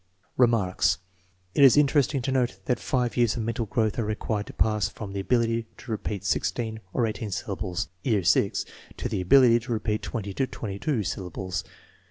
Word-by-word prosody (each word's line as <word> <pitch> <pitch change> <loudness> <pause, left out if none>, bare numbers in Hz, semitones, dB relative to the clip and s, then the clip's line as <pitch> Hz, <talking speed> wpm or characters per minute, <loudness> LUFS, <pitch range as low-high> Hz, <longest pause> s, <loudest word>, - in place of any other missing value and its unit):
Remarks. 115 -7 +3 0.6
It 140 - +4
is 135 +1 +8
interesting 140 -2 +3
to 135 - -1
note 130 -2 +1
that 125 - 0
five 125 -3 -1
years 120 -2 +2
of 115 - -2
mental 115 0 -2
growth 110 +2 0
are - - +1
required 105 0 -2
to - - -9
pass 105 -3 +1
from 100 -1 -8
the 100 - -3
ability 115 +2 +1
to 120 - -9
repeat 105 -2 -3
sixteen 110 +4 -1
or 120 - +1
eighteen 110 -1 -3
syllables 95 -1 -3 0.2
(year 105 -5 +1
VI) 100 +3 +4 0.5
to - - -2
the - - -2
ability 120 +4 +6
to 120 +2 -8
repeat 110 -1 -1
twenty 105 -4 -4
or 135 - +2
twenty 100 -5 -6
two 135 -7 0
syllables. 95 0 -4
110 Hz, 185 wpm, -26 LUFS, 100-120 Hz, 0.6 s, is